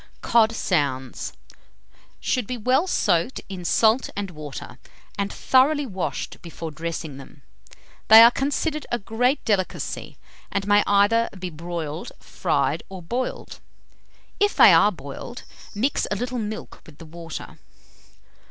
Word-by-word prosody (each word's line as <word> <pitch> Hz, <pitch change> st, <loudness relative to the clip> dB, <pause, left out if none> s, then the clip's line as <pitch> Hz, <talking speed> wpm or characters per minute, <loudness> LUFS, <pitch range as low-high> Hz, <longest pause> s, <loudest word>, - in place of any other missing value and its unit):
COD 225 Hz, -1 st, +4 dB
SOUNDS. 140 Hz, -, -2 dB, 0.9 s
Should 250 Hz, -5 st, -1 dB
be 250 Hz, -, -3 dB
well 255 Hz, -, +2 dB
soaked 175 Hz, -, +1 dB
in 185 Hz, -2 st, -6 dB
salt 220 Hz, +7 st, +3 dB
and 200 Hz, -2 st, -4 dB
water, 145 Hz, -5 st, -9 dB, 0.4 s
and 200 Hz, -1 st, -2 dB
thoroughly 285 Hz, +3 st, +3 dB
washed 190 Hz, -7 st, -4 dB
before 165 Hz, -2 st, -7 dB
dressing 160 Hz, -2 st, -5 dB
them. 140 Hz, 0 st, -14 dB, 0.6 s
They 220 Hz, +1 st, +10 dB
are 235 Hz, -, +8 dB
considered 290 Hz, +3 st, -2 dB
a 240 Hz, -, +1 dB
great 245 Hz, +6 st, 0 dB
delicacy, 195 Hz, -4 st, -2 dB, 0.3 s
and 200 Hz, -1 st, -1 dB
may 205 Hz, 0 st, +5 dB
either 205 Hz, +3 st, +3 dB
be 185 Hz, -1 st, -5 dB
broiled, 165 Hz, +3 st, -6 dB
fried, -, -, -1 dB
or 190 Hz, -2 st, -9 dB
boiled: 245 Hz, +9 st, -4 dB, 0.8 s
if 410 Hz, 0 st, +2 dB
they 190 Hz, -, +8 dB
are 165 Hz, +6 st, +6 dB
boiled, 155 Hz, -, -9 dB, 0.3 s
mix 255 Hz, +8 st, 0 dB
a 205 Hz, -, -1 dB
little 245 Hz, +3 st, -3 dB
milk 215 Hz, 0 st, -6 dB
with 155 Hz, -3 st, -15 dB
the 165 Hz, -, -12 dB
water. 165 Hz, 0 st, -9 dB
200 Hz, 135 wpm, -23 LUFS, 165-240 Hz, 0.9 s, They